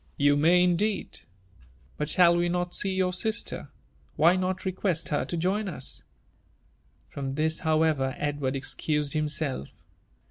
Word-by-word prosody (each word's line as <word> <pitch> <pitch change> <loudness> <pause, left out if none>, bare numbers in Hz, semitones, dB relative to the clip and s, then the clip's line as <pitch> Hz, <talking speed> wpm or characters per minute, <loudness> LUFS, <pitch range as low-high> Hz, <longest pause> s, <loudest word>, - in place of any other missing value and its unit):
You 145 0 +4
may, 170 +5 +4
indeed. 185 +4 0 0.8
But 150 - -3
shall 175 -1 +5
we 175 0 +1
not 175 0 -1
sen 190 -1 0
your 185 -1 +1
sister? 220 +4 -2 0.5
«why 170 +4 +5
not 185 +1 -2
request 185 -3 -1
her 145 - 0
to 170 - -4
join 190 +5 0
us 130 -7 -4 1.1
V - - -28
From 135 -1 -4
this, 160 +1 0
howeveri 155 -4 +1
Edward 145 -2 -2
excused 150 +1 -1
himself. 150 - -1
165 Hz, 140 wpm, -27 LUFS, 145-180 Hz, 1.1 s, shall